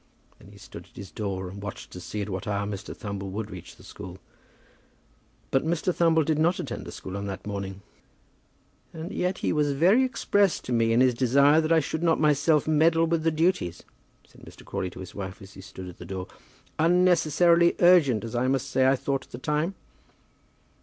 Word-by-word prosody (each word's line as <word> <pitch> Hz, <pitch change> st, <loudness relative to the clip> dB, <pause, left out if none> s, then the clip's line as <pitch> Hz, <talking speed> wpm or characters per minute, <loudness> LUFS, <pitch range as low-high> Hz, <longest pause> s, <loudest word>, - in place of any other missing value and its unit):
Then -, -, -16 dB
he -, -, -15 dB
stood -, -, -11 dB
at -, -, -28 dB
his 95 Hz, -4 st, -9 dB
door, 95 Hz, -1 st, -4 dB
watching 100 Hz, 0 st, -8 dB
to 90 Hz, -, -8 dB
see 105 Hz, +3 st, -5 dB
at 105 Hz, -, -7 dB
what 95 Hz, +2 st, -5 dB
hour 100 Hz, 0 st, -1 dB
Mr. 100 Hz, -1 st, -6 dB
Thumble 100 Hz, -2 st, -5 dB
would 105 Hz, +2 st, -5 dB
reach 90 Hz, -2 st, -10 dB
the -, -, -18 dB
school. -, -, -10 dB, 1.3 s
But 135 Hz, -, +2 dB
Mr. 170 Hz, +3 st, 0 dB
Thumble 165 Hz, -2 st, +3 dB
did 155 Hz, 0 st, 0 dB
not 170 Hz, +3 st, +2 dB
attend 120 Hz, -3 st, -5 dB
the -, -, -7 dB
school 95 Hz, -, -8 dB
on 100 Hz, 0 st, -4 dB
that 95 Hz, -1 st, -6 dB
morning. 100 Hz, -1 st, -5 dB, 1.1 s
"And 160 Hz, +4 st, -7 dB
yet 180 Hz, -1 st, -1 dB
he -, -, +1 dB
was 150 Hz, -2 st, +1 dB
very 185 Hz, -, +4 dB
express 205 Hz, -7 st, +1 dB
to 125 Hz, -, -4 dB
me 115 Hz, -1 st, +2 dB
in 115 Hz, +2 st, +4 dB
his 130 Hz, -1 st, +4 dB
desire 140 Hz, +5 st, +4 dB
that 160 Hz, +1 st, -2 dB
I 160 Hz, -2 st, +4 dB
would 160 Hz, -, -1 dB
not 165 Hz, -2 st, +2 dB
myself 150 Hz, 0 st, +3 dB
meddle 165 Hz, +2 st, +3 dB
with 165 Hz, 0 st, 0 dB
the 165 Hz, -, +2 dB
duties," 160 Hz, -, 0 dB, 0.4 s
said -, -, -20 dB
Mr. -, -, -14 dB
Crawley 90 Hz, -, -3 dB
to -, -, -11 dB
his 90 Hz, -, -9 dB
wife 95 Hz, -2 st, -7 dB
as 100 Hz, -1 st, -13 dB
he -, -, -11 dB
stood 95 Hz, 0 st, -10 dB
at 90 Hz, -, -11 dB
the 90 Hz, -, -9 dB
door, 95 Hz, +1 st, -5 dB, 0.5 s
"unnecessarily 170 Hz, 0 st, +4 dB
urgent, 165 Hz, -11 st, +5 dB
as 115 Hz, -, -6 dB
I 120 Hz, +1 st, 0 dB
must 130 Hz, -1 st, -1 dB
say 130 Hz, 0 st, +3 dB
I 135 Hz, -, +4 dB
thought 135 Hz, 0 st, -2 dB
at -, -, -30 dB
the -, -, -7 dB
time." 150 Hz, +8 st, -1 dB
135 Hz, 205 wpm, -26 LUFS, 100-165 Hz, 1.3 s, urgent